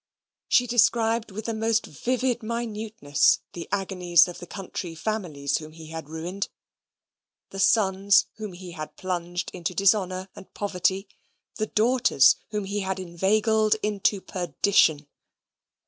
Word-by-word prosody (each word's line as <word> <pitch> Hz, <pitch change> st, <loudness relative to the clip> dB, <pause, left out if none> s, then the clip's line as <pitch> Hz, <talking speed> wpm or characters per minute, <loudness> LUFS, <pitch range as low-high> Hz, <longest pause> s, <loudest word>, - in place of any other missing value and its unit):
She 245 Hz, -, +4 dB
described 230 Hz, -1 st, +2 dB
with 210 Hz, +2 st, -7 dB
the 230 Hz, -, -2 dB
most 225 Hz, 0 st, +1 dB
vivid 250 Hz, -, -1 dB
minuteness 220 Hz, -7 st, 0 dB
the 170 Hz, -, -7 dB
agonies 185 Hz, -3 st, +3 dB
of 175 Hz, -, -8 dB
the 175 Hz, -, -9 dB
country 180 Hz, -3 st, -6 dB
families 160 Hz, -8 st, -2 dB
whom 155 Hz, 0 st, -11 dB
he 160 Hz, -1 st, -11 dB
had 160 Hz, -2 st, -7 dB
ruined 175 Hz, +5 st, -4 dB, 1.0 s
the 195 Hz, -, -7 dB
sons 195 Hz, -1 st, +4 dB
whom 215 Hz, -3 st, -6 dB
he 180 Hz, 0 st, -9 dB
had 155 Hz, -2 st, -8 dB
plunged 175 Hz, -1 st, -3 dB
into 180 Hz, 0 st, -4 dB
dishonour 190 Hz, -1 st, +2 dB
and 190 Hz, -, -13 dB
poverty 195 Hz, 0 st, -1 dB, 0.5 s
the 215 Hz, -, -1 dB
daughters 225 Hz, -, +4 dB
whom 210 Hz, -1 st, -2 dB
he 200 Hz, +2 st, -2 dB
had 190 Hz, -1 st, -2 dB
inveigled 215 Hz, +5 st, +2 dB
into 205 Hz, -1 st, +1 dB
perdition. 175 Hz, -5 st, +2 dB
195 Hz, 130 wpm, -25 LUFS, 175-215 Hz, 1.0 s, She